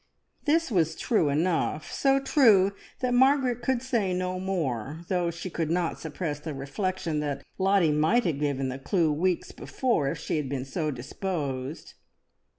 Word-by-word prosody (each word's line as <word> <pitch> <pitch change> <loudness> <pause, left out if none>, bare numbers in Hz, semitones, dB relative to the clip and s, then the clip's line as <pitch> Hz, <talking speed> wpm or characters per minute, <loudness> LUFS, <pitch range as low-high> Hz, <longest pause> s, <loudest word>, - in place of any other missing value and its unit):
This 315 -1 +2
was 165 -6 +2
true 210 - +1
enough, 155 0 0
so 275 0 +3
true 225 -9 +5 0.3
that 250 -1 +1
Margaret 260 -1 +3
could 260 -1 0
say 225 -8 0
no 185 0 -2
more, 155 - -2
though 180 -2 +1
she 170 +2 -6
could 165 -2 -2
not 170 0 0
suppress 155 -1 -4
the 150 -1 -6
reflection 165 +3 -2
that 145 -2 -3 0.2
Lottie 190 -4 +3
might 160 +11 +3
have 155 -5 0
given 140 -3 -1
the 130 +1 -5
clue 165 +2 +1
weeks 175 +3 0
before, 235 - -1
if - - -3
she - - -2
had 145 -3 -2
been 135 -2 -3
so 155 +3 -2
disposed. 140 0 -4
170 Hz, 160 wpm, -27 LUFS, 150-200 Hz, 0.3 s, true